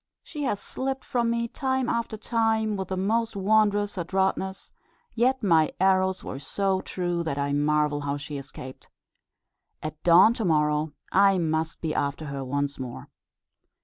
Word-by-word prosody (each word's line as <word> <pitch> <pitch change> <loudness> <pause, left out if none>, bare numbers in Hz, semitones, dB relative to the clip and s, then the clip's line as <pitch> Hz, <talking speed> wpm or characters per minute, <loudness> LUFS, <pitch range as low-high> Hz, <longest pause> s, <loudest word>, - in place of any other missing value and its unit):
She 300 - -7
has 205 -6 -1
slipped 265 +3 -4
from 240 -2 0
me 235 0 0
time 260 +1 -1
after 230 -2 -2
time 220 -1 +1
with 190 -1 -4
the 190 - -3
most 225 +4 0
wondrous 205 0 +2
adroitness; 190 +2 -1 0.4
yet 255 +2 +1
my 165 -5 +3
arrows 190 0 +2
were 130 - -6
so 190 +5 -1
true 175 -2 -2
that 160 -4 -3
I 140 0 -1
marvel 150 0 +1
how 145 0 -2
she 145 0 -6
escaped. 130 -1 -10 0.9
At 155 0 -6
dawn 180 +6 +7
to 235 - -3
morrow 150 -3 +1 0.2
I 195 0 +5
must 160 -2 -1
be 160 -2 -1
after 145 +2 -2
her 140 -2 -4
once 140 +1 -2
more." 125 -2 -7
185 Hz, 155 wpm, -26 LUFS, 150-220 Hz, 0.9 s, dawn